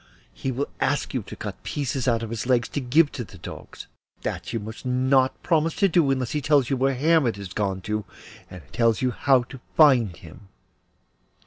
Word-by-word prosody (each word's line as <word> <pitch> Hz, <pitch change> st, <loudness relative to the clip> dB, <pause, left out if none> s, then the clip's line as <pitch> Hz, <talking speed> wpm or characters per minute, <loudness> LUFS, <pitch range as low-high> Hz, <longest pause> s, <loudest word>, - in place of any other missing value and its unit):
He 130 Hz, -, -3 dB
will 135 Hz, +3 st, -2 dB
ask -, -, 0 dB
you -, -, -1 dB
to -, -, -10 dB
cut -, -, -7 dB
pieces 135 Hz, -3 st, -3 dB
out 115 Hz, -2 st, +2 dB
of 115 Hz, -, -6 dB
his 115 Hz, +1 st, -4 dB
legs 125 Hz, -1 st, +2 dB
to 145 Hz, -, -3 dB
give 145 Hz, +5 st, +3 dB
to 125 Hz, -, -5 dB
the 95 Hz, -, -13 dB
dogs, -, -, -10 dB, 0.3 s
but -, -, -29 dB
that -, -, -4 dB
you 115 Hz, -, -2 dB
must 110 Hz, +1 st, -8 dB
not 130 Hz, +1 st, +1 dB
promise 160 Hz, 0 st, +1 dB
to 200 Hz, -, +3 dB
do 165 Hz, -5 st, +3 dB
unless 130 Hz, -3 st, 0 dB
he 150 Hz, -, -1 dB
tells 145 Hz, -3 st, +2 dB
you -, -, +3 dB
where 135 Hz, +1 st, +1 dB
Hermod 145 Hz, -4 st, +3 dB
has 100 Hz, -2 st, -8 dB
gone 95 Hz, -3 st, -1 dB
to, 105 Hz, +2 st, -2 dB, 0.5 s
and 90 Hz, -3 st, -10 dB
tells 115 Hz, -1 st, +2 dB
you 125 Hz, -, +2 dB
how 130 Hz, 0 st, +3 dB
to 130 Hz, +2 st, -11 dB, 0.2 s
find 125 Hz, -, +5 dB
him. 90 Hz, +4 st, -14 dB
125 Hz, 210 wpm, -24 LUFS, 110-140 Hz, 0.5 s, find